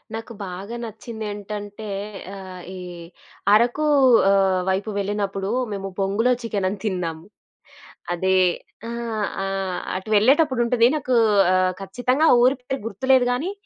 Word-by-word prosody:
నాకు 225 +1 -7
బాగా 190 +5 -7
నచ్చిందేంటంటే 210 -2 -7 0.5
ఆహ్, 185 -2 -9
ఈ - - -7 0.8
అరకు 240 +8 +3 0.4
ఆహ్, 195 -2 +3
వైపు 195 +3 -1
వెళ్ళినప్పుడు 200 -1 -2 0.2
మేము 195 -1 -4
బొంగులో 200 +6 +1
చికెనని 200 -4 -2
తిన్నాం. 180 -6 -2 1.0
అదే 190 +2 +1 0.5
ఆహ్, 230 -3 -3 0.2
ఆహ్, 195 -1 -2 0.2
అటు 190 +3 -5
వెళ్ళేటప్పుడు 260 +5 +4
ఉంటది 235 0 +4
నాకు 255 -4 0 0.4
ఆహ్, 185 0 +2
ఖచ్చితంగా 250 +10 +1 0.2
ఊరి 255 +2 +4
పేరు 265 +2 -4
గుర్తులేదు 255 +4 +2
గానీ 290 +10 -1
205 Hz, 115 wpm, -23 LUFS, 195-240 Hz, 1.0 s, వెళ్ళేటప్పుడు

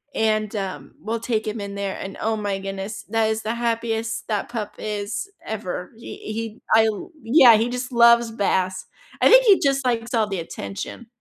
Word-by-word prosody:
and, 215 -1 0
um, 195 -2 -5
we'll 225 +2 -3
take 225 -2 -1
him 215 0 -3
in 200 0 -6
there 200 -1 -3
and, 195 0 -7
oh 220 0 0
my 205 -2 -2
goodness, 195 +2 -5
that 225 0 +2
is 220 0 -1
the 220 +2 -1
happiest 230 -1 -2
that 210 -1 -2
pup 220 -3 -4
is 210 - -4 0.2
ever. 185 -4 -5
He 230 - -10 0.2
he 225 0 -5
I 220 0 +6
l 220 - -3
Yeah, 235 -1 +7
he 230 +2 0
just 250 +1 -4
loves 235 -1 +5
baths. 185 -3 0 0.4
I - - +6
think - - +8
he 400 -3 +6
just 275 -1 +1
likes 235 0 -1
all 220 -2 +2
the 195 -3 -2
attention. 100 - -7
220 Hz, 195 wpm, -23 LUFS, 200-235 Hz, 0.4 s, think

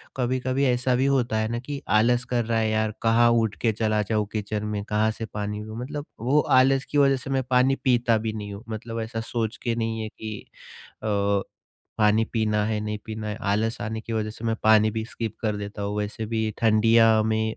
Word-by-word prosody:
कभी-कभी 130 +1 0
ऐसा 125 0 +2
भी 130 +2 +2
होता 125 -5 +1
है 110 0 0
ना 120 - -2
कि 140 +2 -6
आलस 120 +4 +3
कर 120 -1 +1
रहा 115 0 0
है, 110 - +1
यार 110 0 +1
कहाँ 115 +1 +4
उठ 115 -3 +1
के 115 - +3
चला 110 -1 +1
जाऊँ 105 -1 +1
किचन 105 0 -3
में, 105 -1 -3
कहाँ 105 +1 +1
से 115 - -6
पानी 105 0 -4
मतलब 125 +7 -6
वो 130 +6 +2 0.2
आलस 135 +1 +4
की 145 - 0
वजह 135 -1 +4
से 130 - -8
मैं 135 -1 +1
पानी 130 +1 +4
पीता 120 -4 +3
भी 110 0 -3
नहीं 105 -2 -6
हूँ, 100 - -9
मतलब 115 +1 -5
ऐसा 115 0 -4
सोच 115 -1 -3
के 120 -2 0
नहीं 115 -1 -2
है 110 - -3
कि 110 -1 -7 0.7
अ, 110 - -4 0.9
पानी 105 +1 +4
पीना 105 -2 +1
है, 110 -1 -1
नहीं 105 0 -3
पीना 110 -1 -5
है, 105 - -3
आलस 110 +3 0
आने 110 +1 -3
की 115 +1 -7
वजह 110 -1 -1
से 110 - -10
मैं 115 -1 0
पानी 110 0 +5
भी 110 0 -3
स्किप 115 -2 -5
कर 105 -2 -1
देता 100 0 -6
हूँ, 100 +1 -3
वैसे 105 +2 -3
भी 110 0 -1
ठंडिया 115 0 +5
में 110 0 0
अ, - - -11
110 Hz, 220 wpm, -25 LUFS, 110-120 Hz, 0.9 s, पानी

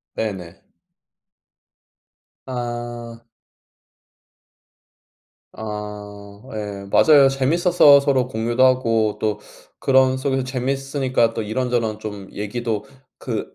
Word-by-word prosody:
네네. 95 -6 -5 1.8
아. 120 -2 -6 2.3
아 105 -1 -8
예 100 -2 -6
맞아요. 145 -3 +6
재밌어서 145 +2 +5
서로 135 -3 +1
공유도 120 +1 0
하고 115 -4 +2
또 105 -1 -1 0.4
그런 130 -1 +3
속에서 135 -1 -1
재미있으니까 130 -2 -1
또 - - -3
이런저런 115 -1 -1
좀 105 -3 -7
얘기도 105 +1 -3 0.3
그 - - -5
120 Hz, 180 characters per minute, -21 LUFS, 105-130 Hz, 2.3 s, 맞아요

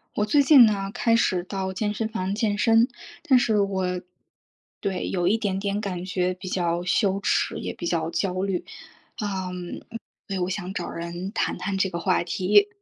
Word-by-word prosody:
我 210 - +1
最 285 +7 +4
近 275 -3 +8
呢， 200 -3 0
开 230 -1 +2
始 185 -6 +2
到 190 0 -3
健 210 +2 -1
身 220 +1 -2
房 195 -4 -2
健 210 -1 0
身， 225 +2 +4 0.4
但 275 -6 +5
是 230 -4 +2
我 190 -2 0 0.8
对， 190 -2 -2
有 175 -2 0
一 210 +5 +3
点 200 -4 -1
点 200 0 -1
感 185 -4 -4
觉 185 -1 0
比 185 +1 -10
较 175 -1 0
羞 195 +2 +1
耻， - - +1
也 - - -4
比 - - -7
较 165 -2 0
焦 185 +2 -1
虑， 195 -2 -2 0.6
嗯， 185 -3 -4 0.5
对， 195 -2 -3
我 180 0 -1
想 190 0 -4
找 175 -3 -4
人 170 +3 -5
谈 - - -1
谈 200 -2 -2
这 190 0 +1
个 170 -1 -4
话 185 0 +1
题。 200 +4 +3
190 Hz, 200 characters per minute, -25 LUFS, 180-210 Hz, 0.8 s, 近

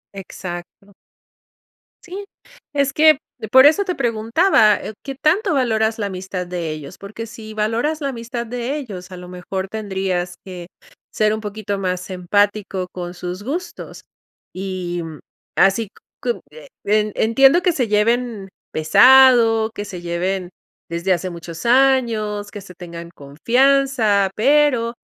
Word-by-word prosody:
Exacto. 190 +1 -9 1.1
Sí, 380 +3 -7 0.5
es 280 -1 +1
que 310 +1 +5 0.3
por 260 +2 +7
eso 320 +7 +5
te 360 - -2
preguntaba, 230 - +3
eh, - - -6
qué 275 -1 -5
tanto 330 - +1
valoras 225 -4 +1
la 205 - -1
amistad 185 -1 -5
de 175 -3 -4
ellos, 155 +3 -8
porque 215 +3 -8
si 220 -1 -10
valoras 230 +9 -1
la 280 - -1
amistad 235 -1 -5
de 245 +3 -3
ellos, 195 -10 -8
a - - -7
lo 180 0 -10
mejor 190 +1 -5
tendrías 190 -4 -3
que 180 -2 -9 0.5
ser 215 0 +2
un 215 - -3
poquito 205 -1 -4
más 185 -1 -3
empático 190 +1 0
con 175 -1 -6
sus 180 +1 -6
gustos. 335 +9 -6 0.5
Y, 185 -2 -4
mm, 160 -3 -8 0.4
así, 195 +4 +3
c - - -19 0.3
cu 240 -1 -2
eh, 155 -1 -13 0.2
en 210 0 +1
entiendo 270 +9 +4
que 360 - +2
se 255 -7 -1
lleven 215 -1 0 0.2
pesado, 225 +5 +6
que 205 - -5
se 180 -3 -8
lleven 175 +2 -2 0.4
desde 170 +3 0
hace 185 +1 -3
muchos 170 0 -9
años, 235 -5 +2
que 205 - -7
se 185 -2 -12
tengan 170 -1 -9
confianza, 230 - +2
pero 255 -1 +3
210 Hz, 145 wpm, -20 LUFS, 185-245 Hz, 1.1 s, por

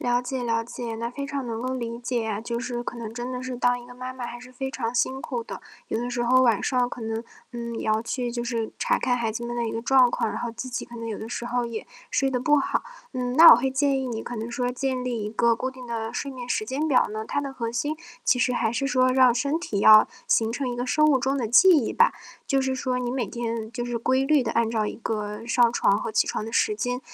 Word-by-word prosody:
了 245 0 +1
解 250 0 -4
了 230 -1 0
解， 235 -1 -6
那 230 +1 -3
非 280 +3 -5
常 280 -2 -4
能 230 -1 -4
够 255 +1 -2
理 235 -2 -4
解 240 -1 -2
啊， 210 -1 -2
就 235 +1 -3
是 240 -1 -3
可 240 - -6
能 225 -2 -6
真 240 +2 -5
的 250 0 -5
是 255 -1 -4
当 245 0 +1
一 240 - -13
个 245 - -12
妈 255 +1 -6
妈 255 -1 -6
还 240 0 -7
是 250 +1 -13
非 265 +1 -4
常 230 -3 -3
辛 265 +2 0
苦 240 -3 -4
的。 - - -8 0.3
有 220 - -2
的 245 +1 -3
时 240 0 -1
候 255 +2 +4
晚 235 -5 +3
上 250 -1 +1
可 - - -8
能， 225 0 -3 0.3
呃， 240 - -6 0.2
也 - - -4
要 215 0 +2
去 240 +1 -3
就 240 0 -3
是 230 -2 -2
查 - - +2
看 250 - +1
孩 230 -2 -1
子 235 +2 -5
们 240 0 -4
的 235 -1 -1
一 - - -3
个 225 - -3
状 255 +1 +5
况， - - -1
然 - - -4
后 240 - -3
自 240 +3 -6
己 245 - -4
可 240 - -11
能 230 -1 -6
有 220 - -4
的 220 - -7
时 240 - -4
候 245 0 -1
也 230 -1 -5 0.2
睡 270 - +1
得 250 - 0
不 295 +4 +3
好。 275 - 0 0.3
嗯， 250 -1 -2
那 325 +5 +10
我 - - +11
会 255 +3 0
建 270 0 +1
议 260 - -3
你 225 -2 -4
可 245 - -6
能 225 +1 -4
说 245 +1 -1
建 255 0 -2
立 240 -4 -2
一 210 - -3
个 230 +1 +2
固 255 +3 -3
定 260 -1 -11
的 225 -1 -4
睡 280 - -4
眠 250 -2 -8
时 215 - 0
间 275 +7 -1
表 265 -5 +4
呢？ 215 +1 -4
它 285 - -1
的 280 -1 -5
核 230 -3 -3
心 290 +6 -1 0.3
其 250 - +3
实 250 - +2
还 230 -2 0
是 275 +4 -1
说 255 -1 +3
让 255 -1 +5
身 280 +6 0
体 220 - -3
要 215 +1 +8 0.2
形 225 0 +2
成 260 +3 -2
一 245 - -3
个 245 +1 -2
生 305 +4 +3
物 290 -4 +4
钟 270 +2 0
的 240 -4 -1
记 245 - +7
忆 300 -10 +4
吧。 480 +1 +4 0.3
就 275 -3 +2
是 265 0 -1
说 255 -1 -1
你 245 -1 -2
每 255 -2 -1
天 230 0 -4
就 240 0 -4
是 240 -1 -2
规 260 +3 +1
律 295 -2 +3
地 - - -2
按 230 -1 +1
照 220 -2 0
一 - - -4
个 210 -1 -4
上 235 0 +3
床 200 - +3
和 215 - -4
起 - - +2
床 - - -2
的 225 - -6
时 215 - +2
间， 245 +3 -2
245 Hz, 310 characters per minute, -25 LUFS, 230-260 Hz, 0.3 s, 我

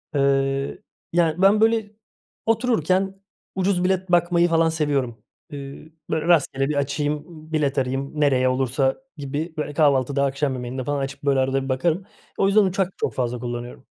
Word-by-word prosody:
Eee, 135 0 +1 0.3
yani, 170 0 +2
ben, 200 +2 +5
böyle, 225 -2 +2 0.5
otururken 195 - +1 0.3
ucuz 185 -1 +1
bilet 185 0 0
bakmayı 175 0 +4
falan 165 0 +3
seviyorum. 140 -8 -1 0.3
Eee, 140 +2 -9 0.2
böyle, 160 +1 -1
rastgele 140 -5 +2
bir 150 - -1
açayım, 145 +1 -1 0.3
bilet 145 -3 +1
arayayım 135 +3 -2
nereye 130 -3 +3
olursa 130 +1 +1 0.2
gibi, 145 +4 -4
böyle, 150 -1 -3
kahvaltıda, 140 -2 +2
akşam 140 0 -1
yemeğinde 130 +1 -4
falan 145 +2 -1
açıp, 135 +1 -5
böyle, 140 -2 +2
arada 135 +1 +1
bir 135 - -6
bakarım. 165 +8 0 0.3
O 195 - +3
yüzden 205 +2 +5
uçak 190 -1 0
çok - - -2
fazla 125 -1 -2
kullanıyorum. 120 0 -6
145 Hz, 155 wpm, -23 LUFS, 135-175 Hz, 0.5 s, ben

